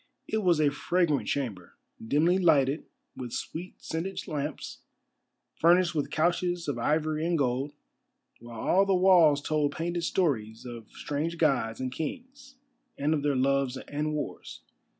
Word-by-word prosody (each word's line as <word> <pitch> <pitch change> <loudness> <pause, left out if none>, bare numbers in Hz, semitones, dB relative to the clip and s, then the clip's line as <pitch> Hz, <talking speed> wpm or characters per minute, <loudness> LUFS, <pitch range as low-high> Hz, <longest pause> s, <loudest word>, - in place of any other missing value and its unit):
It 220 - -1
was 175 -6 +3
a 150 -2 +3
fragrant 165 0 0
chamber, 110 -11 -3 0.3
dimly 160 +10 +2
lighted 145 -4 +3 0.3
with 125 -2 -6
sweet 175 +3 -5
scented 175 +4 -4
lamps, 150 -1 -4 0.7
furnished 175 +1 +4
with 150 -3 -1
couches 175 +1 0
of 140 -5 -2
ivory 155 +4 0
and 170 0 +1
gold, 135 +1 0 0.7
while 120 -1 -10
all 195 +2 +3
the 195 - +3
walls 175 -6 +5
told 150 -2 0
painted 170 +1 -2
stories 120 - -1
of 120 -3 -8
strange 155 +4 -3
gods 135 -8 +1
and 130 -1 -3
kings, 265 - -7 0.4
and 145 +3 +1
of 150 - 0
their 145 -1 +1
loves 135 0 +1
and 150 +3 -3
wars. 150 - -6
150 Hz, 145 wpm, -28 LUFS, 135-175 Hz, 0.7 s, walls